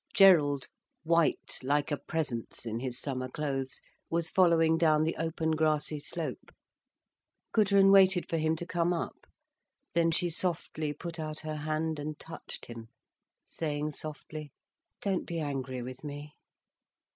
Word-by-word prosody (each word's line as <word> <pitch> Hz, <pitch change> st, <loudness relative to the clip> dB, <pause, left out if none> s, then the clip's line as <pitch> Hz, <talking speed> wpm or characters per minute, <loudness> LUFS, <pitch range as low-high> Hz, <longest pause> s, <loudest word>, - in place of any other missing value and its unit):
Gerald, 155 Hz, -, +6 dB, 0.4 s
white 165 Hz, 0 st, +2 dB
like 145 Hz, +3 st, +1 dB
a 145 Hz, -, +1 dB
presence 140 Hz, -10 st, -3 dB
in 115 Hz, 0 st, -2 dB
his 125 Hz, -1 st, -2 dB
summer 130 Hz, -2 st, -3 dB
clothes, 135 Hz, -2 st, -3 dB, 0.3 s
was 165 Hz, 0 st, 0 dB
following 165 Hz, -4 st, +5 dB
down 155 Hz, -2 st, +4 dB
the 160 Hz, -, 0 dB
open 160 Hz, 0 st, -1 dB
grassy 155 Hz, -1 st, +1 dB
slope. 150 Hz, -2 st, -5 dB, 1.0 s
Gudrun 200 Hz, -2 st, +5 dB
waited 190 Hz, -2 st, +6 dB
for 165 Hz, -, -1 dB
him 160 Hz, 0 st, +2 dB
to 175 Hz, -, -6 dB
come 175 Hz, 0 st, +1 dB
up. 170 Hz, -, -5 dB, 0.7 s
Then 170 Hz, -1 st, +3 dB
she 170 Hz, +1 st, +1 dB
softly 160 Hz, -3 st, 0 dB
put 165 Hz, +3 st, -7 dB
out 155 Hz, -1 st, -4 dB
her 155 Hz, -1 st, -4 dB
hand 155 Hz, +1 st, -1 dB
and 150 Hz, +1 st, -4 dB
touched 165 Hz, -, -9 dB
him, 115 Hz, -1 st, -9 dB, 0.6 s
saying 150 Hz, -1 st, -3 dB
softly: 150 Hz, 0 st, -7 dB, 0.5 s
"Don't 195 Hz, -3 st, 0 dB
be 170 Hz, -1 st, -3 dB
angry 135 Hz, -4 st, -3 dB
with 130 Hz, +3 st, -8 dB
me." 145 Hz, 0 st, -7 dB
155 Hz, 140 wpm, -30 LUFS, 145-165 Hz, 1.0 s, Gerald